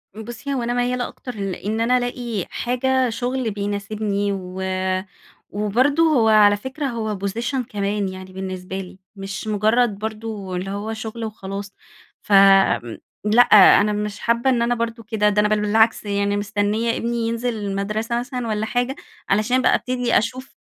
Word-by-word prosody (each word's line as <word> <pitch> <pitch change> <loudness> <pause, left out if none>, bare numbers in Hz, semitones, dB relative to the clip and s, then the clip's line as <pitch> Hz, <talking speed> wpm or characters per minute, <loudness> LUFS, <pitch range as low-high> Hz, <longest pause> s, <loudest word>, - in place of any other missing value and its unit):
بصي، 235 +5 -6
هو 255 -3 -1
أنا 240 +1 -1
ميَّالة 245 0 0
أكتر 250 -2 -9
لإن 205 +2 -3
أنا 250 +2 +3
الاقي 245 -5 -3
حاجة 255 +1 0
شغل 245 0 -2
بيناسبني 205 0 -2
و 185 -1 -5 0.9
وبرضه 245 +10 +2
هو 285 -9 +3
على 205 -1 +6
فكرة 265 +7 -5
هو 220 -5 -3
position 235 +6 -2
كمان 200 -1 -1
يعني 185 0 -9
بالنسبة 185 0 -5
لي، 185 0 -9 0.2
مش 195 +1 -6
مجرد 215 +1 +2
برضه 215 -3 -5
اللي 185 +2 -3
هو 205 +2 -4
شغل 220 +1 -6
وخلاص 200 -2 -6 0.5
فآمم، 195 - +4 0.3
لأ 215 +3 +6 0.4
أنا 210 0 +1
مش 210 0 -3
حابّة 235 +2 +1
إن 245 -2 +2
أنا 240 +1 +1
برضه 230 0 -3
كده 215 -1 +1
ده 210 0 +1
أنا 210 - +2
بل 215 0 +1
بالعكس 220 +2 +3
يعني 200 0 0
مستنية 210 +2 0
ابني 235 +1 -2
ينزل 230 +1 -2
المدرسة 210 +3 -2
مثلًا 250 -1 -4
والَّا 215 -1 -1
حاجة، 245 +3 -1 0.3
علشان 215 +6 +2
بقى 255 - +4
ابتدي 250 -1 0
أشوف 255 +4 -3
215 Hz, 155 wpm, -21 LUFS, 200-240 Hz, 0.9 s, على